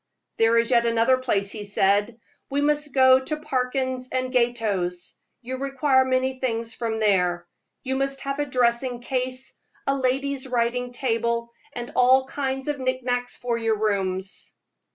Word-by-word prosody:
"There 225 Hz, +1 st, +4 dB
is 230 Hz, +2 st, +2 dB
yet 235 Hz, -1 st, +4 dB
another 230 Hz, +3 st, +3 dB
place," 200 Hz, -6 st, 0 dB
he 210 Hz, -, -5 dB
said; 205 Hz, +3 st, +1 dB, 0.3 s
"we 280 Hz, +1 st, 0 dB
must 295 Hz, 0 st, +1 dB
go 260 Hz, 0 st, +6 dB
to 300 Hz, +4 st, -3 dB
Parkins 260 Hz, -3 st, -2 dB
& -, -, -24 dB
Gotto's. 230 Hz, -9 st, -1 dB, 0.2 s
You 260 Hz, +2 st, -4 dB
require 270 Hz, 0 st, +2 dB
many 260 Hz, 0 st, 0 dB
things 230 Hz, -3 st, -2 dB
from 225 Hz, -2 st, -3 dB
there. 180 Hz, -4 st, +2 dB, 0.4 s
You 265 Hz, 0 st, -1 dB
must 275 Hz, 0 st, -1 dB
have 275 Hz, +1 st, -3 dB
a 290 Hz, -, +1 dB
dressing 245 Hz, -1 st, +1 dB
case, 255 Hz, +1 st, -3 dB, 0.3 s
a 275 Hz, -, +2 dB
lady's 270 Hz, +1 st, -1 dB
writing 245 Hz, 0 st, -1 dB
table, 235 Hz, -2 st, -1 dB, 0.2 s
and 240 Hz, 0 st, -6 dB
all 260 Hz, +1 st, +5 dB
kinds 270 Hz, 0 st, -3 dB
of 295 Hz, -1 st, -2 dB
knickknacks 250 Hz, -1 st, -2 dB
for 235 Hz, -1 st, -2 dB
your 225 Hz, -1 st, +1 dB
rooms." 195 Hz, -2 st, -2 dB
250 Hz, 155 wpm, -24 LUFS, 230-265 Hz, 0.4 s, go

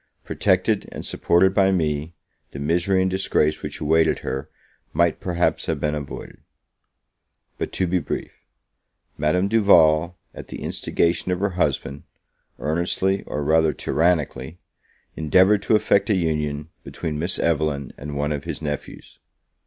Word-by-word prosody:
Protected -, -, +1 dB
and -, -, -7 dB
supported 95 Hz, +2 st, +2 dB
by 95 Hz, -1 st, +4 dB
me, 80 Hz, -2 st, -1 dB, 0.4 s
the -, -, -7 dB
misery 85 Hz, +6 st, +1 dB
and 95 Hz, -, 0 dB
disgrace 95 Hz, -5 st, +1 dB
which -, -, -6 dB
awaited 80 Hz, +1 st, +2 dB
her 65 Hz, +2 st, -4 dB, 0.4 s
might 85 Hz, -1 st, +2 dB
perhaps 90 Hz, -1 st, -1 dB
have -, -, -1 dB
been 75 Hz, -1 st, -1 dB
avoided. 75 Hz, -3 st, -7 dB, 1.2 s
But, -, -, -3 dB
to 95 Hz, -, 0 dB
be 90 Hz, +1 st, +1 dB
brief -, -, -4 dB, 0.8 s
Madame 80 Hz, +6 st, +1 dB
Duval, 85 Hz, -6 st, +4 dB, 0.2 s
at -, -, -10 dB
the -, -, -8 dB
instigation 85 Hz, +2 st, 0 dB
of 90 Hz, -, -1 dB
her 100 Hz, +1 st, 0 dB
husband, 70 Hz, -5 st, -1 dB, 0.6 s
earnestly, 85 Hz, +5 st, 0 dB
or 75 Hz, -, -3 dB
rather 80 Hz, +1 st, +3 dB
tyrannically, 80 Hz, -1 st, 0 dB, 0.6 s
endeavoured 95 Hz, +6 st, +4 dB
to 110 Hz, -, +2 dB
effect 105 Hz, 0 st, +2 dB
a 105 Hz, -, +3 dB
union 75 Hz, -3 st, -1 dB
between 75 Hz, -2 st, -5 dB
Miss 85 Hz, +4 st, -2 dB
Evelyn 75 Hz, -4 st, -1 dB
and 75 Hz, 0 st, -7 dB
one 75 Hz, +1 st, -1 dB
of 75 Hz, -1 st, -3 dB
his 85 Hz, -3 st, -4 dB
nephews. 75 Hz, -2 st, -6 dB
80 Hz, 140 wpm, -23 LUFS, 75-90 Hz, 1.2 s, by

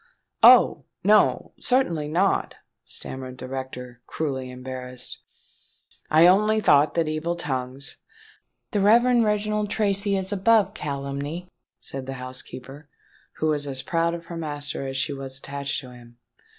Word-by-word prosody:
"Oh! -, -, +7 dB, 0.2 s
no—certainly 175 Hz, -, +2 dB
not," 180 Hz, +6 st, +1 dB, 0.3 s
stammered 130 Hz, -1 st, -7 dB
the 130 Hz, -, -7 dB
rector, 125 Hz, -2 st, -7 dB
cruelly 135 Hz, -5 st, -3 dB
embarrassed: 125 Hz, 0 st, -7 dB, 0.9 s
"I 160 Hz, +2 st, +6 dB
only 215 Hz, +4 st, +5 dB
thought 145 Hz, -7 st, +4 dB
that 165 Hz, -2 st, +1 dB
evil 155 Hz, +3 st, -2 dB
tongues——" 130 Hz, -4 st, -4 dB, 0.7 s
"The 205 Hz, -, +1 dB
Reverend 235 Hz, +3 st, +5 dB
Reginald 210 Hz, 0 st, 0 dB
Tracy 200 Hz, -1 st, +1 dB
is 190 Hz, +1 st, -3 dB
above 205 Hz, 0 st, +3 dB
calumny," 140 Hz, +5 st, -4 dB, 0.3 s
said 135 Hz, -1 st, -8 dB
the 135 Hz, -, -4 dB
housekeeper, 130 Hz, +2 st, -9 dB, 0.4 s
who 155 Hz, -, -1 dB
was 145 Hz, -1 st, 0 dB
as 130 Hz, -2 st, -2 dB
proud 170 Hz, 0 st, 0 dB
of 170 Hz, 0 st, -9 dB
her 170 Hz, 0 st, -7 dB
master 145 Hz, -3 st, -3 dB
as 135 Hz, 0 st, -4 dB
she 140 Hz, -, 0 dB
was 135 Hz, -1 st, -6 dB
attached 140 Hz, +1 st, -4 dB
to 130 Hz, -2 st, -12 dB
him. 120 Hz, -1 st, -15 dB
145 Hz, 135 wpm, -24 LUFS, 130-185 Hz, 0.9 s, Oh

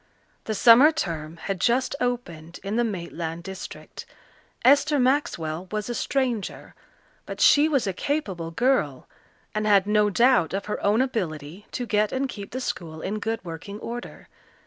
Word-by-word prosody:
The 220 Hz, -, -2 dB
summer 245 Hz, +8 st, +7 dB
term 165 Hz, -, -4 dB
had 185 Hz, +2 st, -4 dB
just 255 Hz, +3 st, +2 dB
opened 175 Hz, -10 st, -3 dB
in 200 Hz, +2 st, -3 dB
the 240 Hz, -, +2 dB
Maitland 170 Hz, -5 st, -4 dB
district. 190 Hz, +1 st, -9 dB, 0.6 s
Esther 290 Hz, +2 st, +5 dB
Maxwell 190 Hz, -, 0 dB
was 215 Hz, +1 st, -3 dB
a -, -, -1 dB
stranger, 245 Hz, -5 st, -2 dB, 0.5 s
but -, -, -6 dB
she 295 Hz, +2 st, +6 dB
was 275 Hz, -6 st, +1 dB
a 195 Hz, -, -1 dB
capable 190 Hz, -, -2 dB
girl, 165 Hz, -, 0 dB, 0.5 s
and 215 Hz, 0 st, -1 dB
had 200 Hz, -2 st, +5 dB
no 210 Hz, 0 st, +3 dB
doubt 235 Hz, -5 st, +3 dB
of 195 Hz, -, -3 dB
her 210 Hz, -, -4 dB
own 210 Hz, +5 st, +3 dB
ability 180 Hz, -, -4 dB
to 250 Hz, -, -3 dB
get 210 Hz, -1 st, +1 dB
and 265 Hz, +1 st, -1 dB
keep 205 Hz, -5 st, -8 dB
the 255 Hz, -, -5 dB
school 160 Hz, -9 st, -5 dB
in 210 Hz, +3 st, -2 dB
good 225 Hz, -3 st, -3 dB
working 175 Hz, +5 st, -7 dB
order. 240 Hz, +2 st, -7 dB
210 Hz, 160 wpm, -25 LUFS, 170-245 Hz, 0.6 s, summer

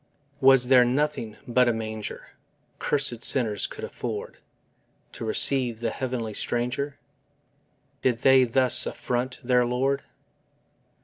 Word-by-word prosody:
Was 135 Hz, -2 st, +5 dB
there 130 Hz, -2 st, +7 dB
nothing 125 Hz, -3 st, -1 dB
but 125 Hz, +1 st, +3 dB
a 120 Hz, -, +3 dB
manger 110 Hz, -1 st, -6 dB, 0.5 s
Cursèd 135 Hz, -5 st, -1 dB
sinners 110 Hz, -6 st, 0 dB
could 445 Hz, -, -10 dB
afford 460 Hz, 0 st, -6 dB, 0.7 s
To -, -, -8 dB
receive 130 Hz, -, +2 dB
the 115 Hz, -, -2 dB
heavenly 125 Hz, -4 st, -4 dB
stranger? 125 Hz, +6 st, -2 dB, 1.0 s
Did 125 Hz, -2 st, 0 dB
they 130 Hz, -1 st, +6 dB
thus 125 Hz, +1 st, +2 dB
affront 125 Hz, +1 st, -3 dB
their 125 Hz, 0 st, +3 dB
Lord? 135 Hz, +3 st, 0 dB
125 Hz, 115 wpm, -25 LUFS, 120-135 Hz, 1.0 s, there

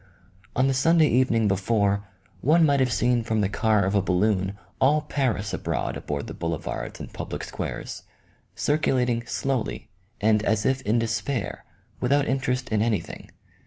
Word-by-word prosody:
On 130 Hz, -, +3 dB
the 135 Hz, -, +2 dB
Sunday 160 Hz, +5 st, +4 dB
even 125 Hz, -1 st, +3 dB
ing 115 Hz, -2 st, +3 dB
before, 100 Hz, 0 st, +1 dB, 0.3 s
one 160 Hz, -, +4 dB
might 140 Hz, -2 st, +3 dB
have 130 Hz, -2 st, +2 dB
seen 120 Hz, 0 st, +2 dB
from 110 Hz, -1 st, 0 dB
the 100 Hz, -, +2 dB
car 105 Hz, 0 st, +2 dB
of 95 Hz, -, 0 dB
a 100 Hz, -, +3 dB
balloon 95 Hz, +1 st, +1 dB, 0.2 s
all 150 Hz, +3 st, +4 dB
Paris 120 Hz, -10 st, -1 dB
abroad -, -, -2 dB
upon 70 Hz, -1 st, -4 dB
the -, -, -7 dB
boule 85 Hz, -1 st, -2 dB
vards -, -, -6 dB
and -, -, -8 dB
public -, -, -5 dB
squares, -, -, -5 dB, 0.5 s
circulating 125 Hz, -6 st, +1 dB
slowly 130 Hz, -4 st, -2 dB, 0.3 s
and 105 Hz, 0 st, +3 dB
as 110 Hz, -1 st, 0 dB
if 130 Hz, 0 st, +1 dB
in 115 Hz, -1 st, +1 dB
despair, 115 Hz, +2 st, -2 dB, 0.3 s
without 140 Hz, +3 st, +2 dB
interest 130 Hz, -1 st, -1 dB
in 110 Hz, -1 st, +1 dB
anything. 110 Hz, -2 st, -2 dB
115 Hz, 160 wpm, -25 LUFS, 105-130 Hz, 0.5 s, Sunday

